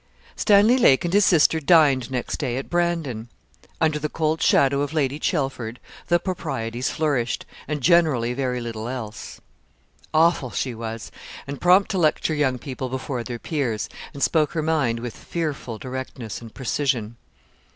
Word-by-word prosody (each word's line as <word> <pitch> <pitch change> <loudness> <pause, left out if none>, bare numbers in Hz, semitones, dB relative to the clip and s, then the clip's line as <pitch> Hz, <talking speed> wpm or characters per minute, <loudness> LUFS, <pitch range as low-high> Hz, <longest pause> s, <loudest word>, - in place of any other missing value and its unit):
Stanley 215 +4 +5
Lake 140 - +5
and 175 - -2
his 205 0 +5
sister 160 -2 +4
dined 145 -5 +4
next 125 -2 -3
day 130 -4 -2
at 135 - -6
Brandon. 165 -10 -1 0.5
Under 155 -2 +2
the 150 0 -2
cold 160 +1 -1
shadow 140 0 +4
of 145 +1 -2
Lady 145 -2 0
Chelford, 135 -8 -2 0.3
the 175 - +4
proprieties 130 - -3
flourished, 140 -7 -1 0.2
and 150 0 -3
generally 150 -7 +3
very 125 -1 -1
little 115 -1 -5
else. 110 -5 -6 0.7
Awful 160 -4 +3
she 125 +1 -2
was, 115 0 -6 0.3
and 140 0 -7
prompt 185 +4 +5
to 190 - 0
lecture 155 0 +2
young 140 -4 +1
people 130 -1 -5
before 130 -1 -3
their 120 0 -5
peers, 120 -6 -2 0.2
and 140 -2 -4
spoke 155 -3 +2
her 160 -2 -1
mind 140 -8 +1
with 120 -2 -6
fearful 150 -8 -4
directness 130 -4 -6
and 115 -1 -10
precision. 130 -4 -1
140 Hz, 155 wpm, -23 LUFS, 120-160 Hz, 0.7 s, Stanley